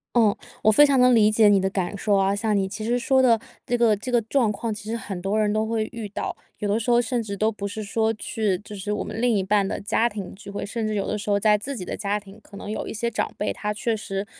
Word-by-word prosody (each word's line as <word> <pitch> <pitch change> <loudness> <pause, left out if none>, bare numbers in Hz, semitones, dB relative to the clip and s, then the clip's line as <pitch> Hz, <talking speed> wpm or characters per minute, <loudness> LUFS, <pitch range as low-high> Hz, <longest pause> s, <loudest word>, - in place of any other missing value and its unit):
嗯， 220 -4 +4 0.3
我 215 - +6
非 295 +8 +7
常 275 -3 +3
能 250 0 +6
理 215 -2 +5
解 215 0 +5
你 200 -1 +5
的 190 - 0
感 190 0 -2
受 205 0 +1
啊。 195 0 +2
像 210 0 0
你 190 -1 +1
其 215 +2 -6
实 240 +2 +1
说 260 +2 +3
的 230 -3 +4 0.3
这 245 - 0
个 230 -3 +4
这 245 +5 -6
个 240 - +4
状 225 -1 +1
况， 220 +2 -3
其 210 +1 -8
实 230 - -1
很 195 -5 -6
多 200 +3 0
人 210 -1 +2
都 215 0 +1
会 220 -1 -1
遇 230 -3 -6
到。 - - -4 0.2
有 210 - -2
的 210 +3 +1
时 230 - -3
候 240 0 +5
甚 240 0 0
至 200 -2 -5
都 220 +2 +2
不 200 -1 -5
是 215 +2 -5
说 220 +2 0
去 215 -4 -1
就 210 +1 -10
是 200 +1 -4
我 210 - -1
们 225 - -5
另 245 - +3
一 190 - 0
半 200 0 +2
的 - - -3
家 225 +3 +1
庭 200 -4 -7
聚 200 +1 -12
会， 200 - -4
甚 220 +1 -3
至 215 - -2
有 195 - -1
的 - - -1
时 205 0 -5
候 200 0 +3
在 210 0 +4
自 270 +7 -4
己 180 - -5
的 - - -4
家 205 0 -1
庭， 200 +1 -15
可 200 -1 -13
能 205 - -7
有 - - -4
一 - - -5
些 235 +2 -2
长 - - -2
辈， 210 - -1
他 210 0 -3
确 220 +2 -1
实 195 -2 -4
215 Hz, 325 characters per minute, -24 LUFS, 200-225 Hz, 0.3 s, 非